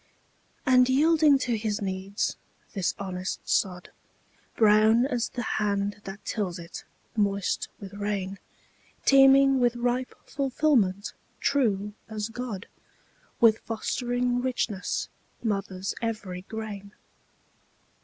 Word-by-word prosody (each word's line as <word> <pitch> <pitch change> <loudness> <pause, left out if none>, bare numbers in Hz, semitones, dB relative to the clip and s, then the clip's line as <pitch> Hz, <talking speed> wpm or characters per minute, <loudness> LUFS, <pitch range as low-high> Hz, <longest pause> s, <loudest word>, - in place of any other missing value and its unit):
And 255 0 +5
yielding 300 +1 +5
to 240 -2 0
his 215 -1 -2
needs, 195 +1 -2 0.4
this 195 -5 -1
honest 185 -1 -5
sod, 180 -2 0 0.6
Brown 220 +2 +5
as 245 -4 -1
the 240 - -4 0.2
hand 205 0 -1
that 195 +1 -8
tills 190 -5 -2
it, 170 0 -9 0.3
moist 200 -2 0
with 195 -1 -9
rain, 200 -1 -3 0.7
Teeming 270 0 +6
with 240 -1 +2
ripe 245 +1 -1
fulfilment, 255 -8 +1 0.3
true 210 -7 +1 0.2
as 215 0 -3
God, 230 -4 -5 0.7
With 225 -2 +5
fostering 245 +2 -1
richness, 240 -6 -2 0.4
mothers 195 -3 -2
every 210 -6 -3
grain. 205 -1 -7
215 Hz, 105 wpm, -27 LUFS, 200-245 Hz, 0.7 s, Teeming